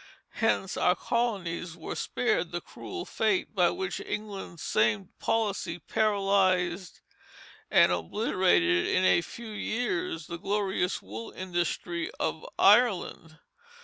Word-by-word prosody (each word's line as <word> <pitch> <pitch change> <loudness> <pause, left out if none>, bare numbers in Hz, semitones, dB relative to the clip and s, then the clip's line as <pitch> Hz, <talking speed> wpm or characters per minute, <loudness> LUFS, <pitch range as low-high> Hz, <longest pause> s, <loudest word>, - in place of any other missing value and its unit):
Hence - - +1
our - - +3
colonies 180 -8 -2
were - - -5
spared - - -1
the - - -2
cruel 375 -1 -8
fate 215 -3 0
by 180 -4 +4
which 190 -1 -3
England's 200 -5 -6
same 110 -3 +1
policy 200 -6 -1
paralyzed 190 -3 +1 0.7
and - - +5
obliterated 90 - +2
in 185 - +2
a 175 - +5
few 230 +6 -9
years 340 - -2
the 170 -1 -6
glorious 195 -1 -1
wool 110 +4 -7
industry 175 -1 -3
of 160 - -2
Ireland. 195 -7 +3
185 Hz, 115 wpm, -28 LUFS, 170-210 Hz, 0.7 s, and